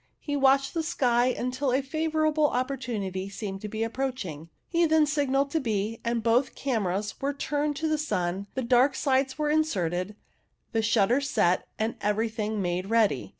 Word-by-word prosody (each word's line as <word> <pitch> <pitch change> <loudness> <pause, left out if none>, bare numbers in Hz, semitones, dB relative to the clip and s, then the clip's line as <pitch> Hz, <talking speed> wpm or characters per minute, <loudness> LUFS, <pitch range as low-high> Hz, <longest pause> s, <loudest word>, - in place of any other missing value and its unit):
He 290 - -3
watched 275 0 +3
the 330 - 0
sky 245 -6 +2
until 255 +2 -1
a 265 +2 +1
favourable 310 +1 +1
opportunity 230 -8 -3
seemed 195 -1 -6
to 210 - -4
be 220 +2 -2
approaching. 225 - -4 0.2
He 340 -1 +2
then 315 -1 +4
signalled 280 -2 +1
to 320 - +1
B, 220 -3 -2
and 235 -1 -1
both 240 +4 +2
cameras 210 -6 -1
were 280 +1 0
turned 290 +1 -1
to 315 +3 -2
the 310 -1 0
sun, 185 -8 -2
the 260 - -1
dark 250 +3 +4
slides 265 -1 +1
were 300 -1 0
inserted, 195 - 0 0.6
the 225 - +1
shutters 230 +5 +2
set, 175 -6 +2
and 220 +1 -2
everything 215 0 -1
made 180 +2 -2
ready. 210 - +2
245 Hz, 165 wpm, -27 LUFS, 210-280 Hz, 0.6 s, then